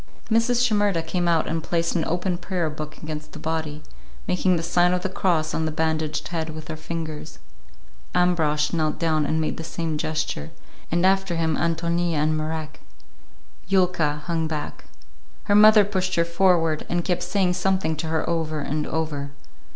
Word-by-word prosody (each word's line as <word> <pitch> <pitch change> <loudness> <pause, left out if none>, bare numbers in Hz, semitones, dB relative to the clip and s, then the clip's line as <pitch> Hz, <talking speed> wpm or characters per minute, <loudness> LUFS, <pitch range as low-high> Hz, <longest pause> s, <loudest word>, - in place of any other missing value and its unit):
Mrs. 235 +2 +3
Shimerda 205 -7 +2
came 175 +2 -1
out 165 -2 +2
and 165 0 -1
placed 170 0 0
an 165 - +1
open 180 +2 -1
prayer 180 -3 -2
book 150 0 -7
against 155 -1 -6
the - - -7
body, 155 -1 -3 0.4
making 180 0 +2
the 165 - -2
sign 175 +1 +3
of 180 0 -1
the 190 - -1
cross 170 -4 0
on 160 - 0
the - - -2
bandaged 160 -1 -1
head 165 -2 -2
with 155 0 -8
her 160 - -3
fingers. 155 -1 -6 0.8
Ambrosch 160 -4 +2
knelt 155 -2 0
down 155 -3 +1
and 160 - +1
made 155 - -1
the 165 - -5
same 160 -1 -3
gesture, 155 - -2 0.4
and 175 +2 +2
after 195 -2 +2
him 160 -1 +1
Ántonia 170 +1 0
and 155 +1 +1
Marek. 155 0 -4 0.9
Yulka 180 -6 +1
hung 165 -2 0
back. 155 -2 -5 0.6
Her 205 - +1
mother 210 0 +8
pushed 185 -2 -1
her 170 - +3
forward, 170 -3 +2
and 175 0 0
kept 180 -2 0
saying 180 0 +1
something 185 -2 0
to 160 - -3
her 160 0 -1
over 160 -2 -1
and 150 +1 -2
over. 150 -3 -2
165 Hz, 175 wpm, -24 LUFS, 155-180 Hz, 0.9 s, mother